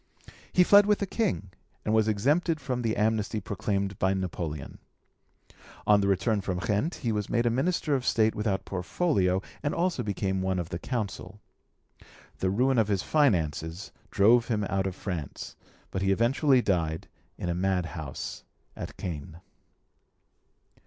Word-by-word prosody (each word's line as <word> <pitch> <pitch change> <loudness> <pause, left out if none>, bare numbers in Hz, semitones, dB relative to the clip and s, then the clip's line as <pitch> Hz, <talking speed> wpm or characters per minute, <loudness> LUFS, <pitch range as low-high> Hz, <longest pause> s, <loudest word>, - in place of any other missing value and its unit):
He 180 - +5
fled 205 +2 +7
with 210 -1 +4
the 200 - -1
King, 185 - -1 0.3
and 110 - +1
was 110 -1 +3
exempted 150 - +1
from 125 -3 -3
the 115 -2 -1
amnesty 110 0 +1
proclaimed 100 -1 -2
by 95 +1 +2
Napoleon. 85 -6 -4 1.1
On 105 -1 +5
the 100 - +1
return 100 +2 +1
from 95 -2 -2
Ghent 105 - 0
he 115 - -2
was 105 -2 -2
made 120 0 +1
a 120 - +3
Minister 150 +4 0
of 130 -2 +1
State 110 -3 +3
without 105 -2 -1
portfolio, 95 - 0 0.2
and 145 - -1
also 175 -5 0
became 100 -3 -1
one 95 0 0
of 85 -2 -3
the 85 - -4
Council. 105 -4 -4 1.0
The 95 - +1
ruin 125 +5 +2
of 110 - +3
his 100 -3 0
finances 85 - +1 0.2
drove 115 +4 +4
him 110 -3 0
out 95 -1 0
of 95 - -4
France, 90 -9 -5 0.4
but 95 - -2
he 95 0 +2
eventually 125 +5 +3
died 80 -4 0 0.3
in - - -4
a 85 - 0
madhouse 85 -5 -3 0.3
at - - -7
Caen. 80 -1 -6
100 Hz, 155 wpm, -28 LUFS, 95-120 Hz, 1.1 s, fled